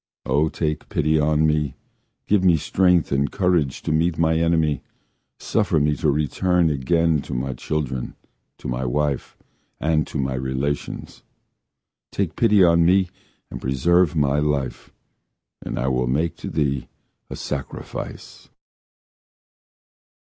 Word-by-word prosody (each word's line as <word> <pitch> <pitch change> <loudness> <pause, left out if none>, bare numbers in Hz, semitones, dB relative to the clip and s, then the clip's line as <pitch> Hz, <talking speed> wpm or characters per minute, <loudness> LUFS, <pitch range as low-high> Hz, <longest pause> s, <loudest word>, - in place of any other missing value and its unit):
O! 75 +4 +2
take 75 -2 -3
pity 80 +1 +1
on 75 +1 +2
me! 75 -3 0 0.5
Give 100 -2 +2
me 90 -3 +5
strength 90 +2 +2
and 70 +1 +1
courage 90 -8 0
to - - -2
meet 80 +2 +1
my 80 0 +2
enemy, 80 -3 +1 0.6
Suffer 80 - +1
me 75 0 +2
to 75 - +1
return 80 +4 +1
again 80 +2 +1
to - - -6
my 65 +2 -2
children, 65 -3 -3 0.4
To - - -8
my 60 +1 -2
wife 70 +2 -1 0.4
And 80 -1 +1
to - - -5
my 65 -1 -1
relations! 65 +3 -3 0.9
Take 95 -5 -2
pity 105 -4 +4
on 85 -1 +5
me 90 +2 +3 0.4
and - - -7
preserve 85 +7 +2
my 75 -1 +2
life 70 -3 -2 0.7
And - - -5
I 65 - -1
will 65 -1 +1
make 80 +7 0
to - - -6
thee 70 -4 -1 0.4
a - - -5
sacrifice. 70 -1 -7
75 Hz, 130 wpm, -22 LUFS, 70-85 Hz, 0.9 s, me